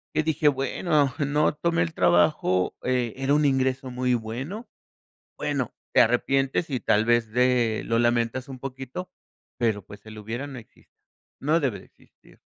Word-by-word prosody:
y 155 - +2
dije: 160 -1 +1
"Bueno, 140 +1 +1
no 150 +1 +2
tomé 170 +3 +1
el 165 -2 -4
trabajo, 90 - +2
eh, 125 -3 0
era 135 +2 +1
un 150 0 +3
ingreso 130 -1 0
muy 125 0 +1
bueno". 130 - -5 0.7
Bueno, - - -2 0.2
te - - +7
arrepientes 135 +6 +1
y 130 -3 -1
tal 110 0 +2
vez, 120 -2 +2
de 125 -2 +2
lo 115 - +1
lamentas 120 +2 +1
un 130 - -8
poquito, 135 +6 -7 0.5
pero, 110 -5 0
pues, 105 +2 -14
el 110 - -10
lo 110 - -9
hubiera 115 +6 -5
no 135 -3 -8
existe. 115 - -21 0.5
No 155 +4 +2
debe 130 - -1
de - - -16
existir. - - -24
130 Hz, 170 wpm, -25 LUFS, 115-145 Hz, 0.7 s, te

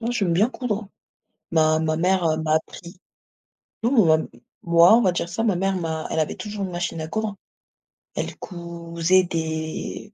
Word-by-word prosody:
Non, 235 +1 -2
j'aime 195 -8 0
bien 205 +8 +3
coudre. 220 -6 -3 0.6
Ma 155 -1 +3
ma 155 0 0
mère, 180 +1 +2
heu, 155 -1 +2
m'a 155 -1 +1
appris. 170 +2 -7 0.9
Non 235 - +2
ou 215 - +6
même, 160 0 +3
m - - -18 0.2
moi 170 +3 +6
on - - +3
va 190 -5 +3
dire 175 0 -3
ça, 210 +6 -2
ma 210 -5 +2
mère 195 +2 0
m'a 160 -3 -3
elle - - 0
avait 155 - -1
toujours 210 -1 -5
une 185 - -6
machine 175 -2 -3
à 155 - -4
coudre. 215 +4 -3 0.8
Elle - - -4
cousait 170 0 0
des 160 +4 -4
175 Hz, 190 wpm, -23 LUFS, 160-195 Hz, 0.9 s, ou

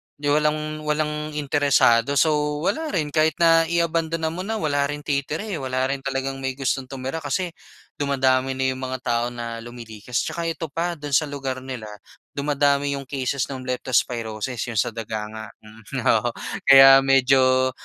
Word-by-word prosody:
'di 145 - -5
walang 155 0 0
walang 150 0 -2
interesado. 140 -3 +3
So, 150 -2 +1
wala 315 - -1
rin. 150 -4 -1
Kahit 155 -1 +3
na 165 -1 +5
iabandona 165 -1 0
mo 180 +2 -5
na, 225 - -1
wala 145 -7 0
ring 145 0 -6
titira 145 +5 -2
eh, 210 -4 -4
wala 130 0 -1
rin 140 - -2
talagang 135 0 -3
may 135 -1 -3
gustong 135 -1 -2
tumira 135 +4 -5
kasi 165 +5 -2 0.5
dumadami 135 -2 +1
na 130 0 0
yung 130 - -6
mga 130 -1 -4
tao 120 0 0
na 120 -1 -6
lumilikas. 115 0 -5
'Tsaka 170 -1 -3
ito 165 0 -3
pa, 170 +2 -2
do'n 145 -1 -7
sa 155 +1 +3
lugar 135 -2 -4
nila, 130 -4 -7 0.5
dumadami 140 0 +1
yung 140 - -6
cases 135 -1 -2
nung 130 -1 -6
Leptospirosis, 120 -2 -1
yung 110 - -1
sa 115 - +1
daga 110 -1 -4
nga. 110 0 -7 0.7
Oo, - - -2 0.4
kaya 135 0 +9
medyo 130 -1 +4
140 Hz, 165 wpm, -23 LUFS, 130-150 Hz, 0.7 s, kaya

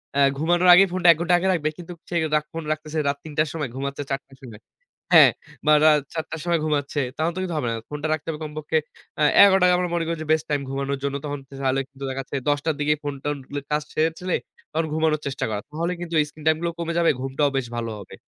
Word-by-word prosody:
অ্যা 140 - +3 0.2
ঘুমানোর 175 +4 +3
আগে 185 +2 +8
ফোনটা 180 -1 +1
১ 165 - +2
ঘন্টা 175 +1 +3
আগে 190 - -1
রাখবে। 155 -3 0
কিন্তু 175 0 -8 0.2
সে 175 - -4 0.4
ফোন 165 - -4
রাখতেছে 155 0 -4
রাত 140 0 0
৩ 155 - -9
টার 155 0 +2
সময় 150 -5 -3
ঘুমাচ্ছে 140 +1 -4
৪ 135 - 0
টার 135 - -18
সময়। 115 -4 -11 0.5
হ্যাঁ? - - +9 0.4
বা 155 - +6
রাত 150 -1 +6
৪ 160 - -2
টার 160 - -5
সময় 170 -1 +2
ঘুমাচ্ছে। 145 -1 -1
তাহলে 160 +2 0
তো - - -3
কিন্তু 175 -3 -3
হবে 145 - -1
না। - - -2
ফোনটা 150 +1 -3
রাখতে 155 +1 -5
হবে 155 -2 -4
কমপক্ষে 155 +1 -2 0.4
আ - - +5 0.2
১১ 195 -1 +6
টায় 180 0 +5
আমরা 180 -1 -1
মনে 165 -1 0
করি 165 0 -2
যে 155 - -6
বেস্ট 155 -1 +2
টাইম 145 -1 0
ঘুমানোর 140 0 -2
জন্য। 140 0 -1
তখন 145 -1 -4
কিন্তু 135 - -13
তাহলে 135 +1 +1 0.3
দেখাচ্ছে 135 +1 -5
১০ 145 - +2
টার 160 -2 +1
দিকে 150 +1 +2
ফোনটোনগুলো 145 0 -4
কাজ 150 0 +1
সেরে 160 +1 +2
ফেলে 180 -1 -1 0.4
তখন 160 +1 0
ঘুমানোর 155 -1 +1
চেষ্টা 135 0 -2
করা। 105 -1 -3
তাহলে 170 +4 -2
কিন্তু 170 -1 -6
এই - - 0
স্ক্রিন 155 0 -14
টাইম 160 0 +4
গুলো 170 0 -1
কমে 170 0 -2
যাবে। 170 -1 +4
ঘুমটাও 135 +2 0
বেশ 135 - -1
ভালো 115 -1 -3
হবে। - - -11
155 Hz, 245 wpm, -23 LUFS, 140-165 Hz, 0.5 s, হ্যাঁ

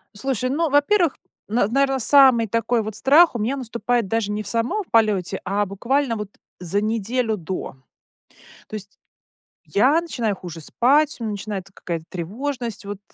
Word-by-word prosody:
Слушай, 255 +2 -2
ну, 320 +3 0
во-первых, 300 +4 +3 0.3
нар 215 -1 +1
наверно, 270 0 +2
самый 255 -3 +5
такой 230 +2 0
вот 215 -1 -5
страх 300 +4 +5
у - - -2
меня 240 +6 -1
наступает 235 -2 -1
даже 215 0 -1
не 210 +1 -3
в - - -10
самом 240 - -1
в - - -30
полете, 205 -5 +2
а 205 +1 0
буквально 235 +6 -1
вот 210 -2 -5 0.3
за 185 +3 -1
неделю 225 +1 -1
до. 180 -5 -5 0.9
То - - -9
есть 205 -1 -8 0.7
я 270 +10 +3
начинаю 235 - -2
хуже 170 -3 -9
спать, 285 - +2
начинается 205 -3 -5
какая-то 165 -2 -5
тревожность 230 - -5
вот, 200 -1 -6
230 Hz, 155 wpm, -22 LUFS, 205-265 Hz, 0.9 s, самый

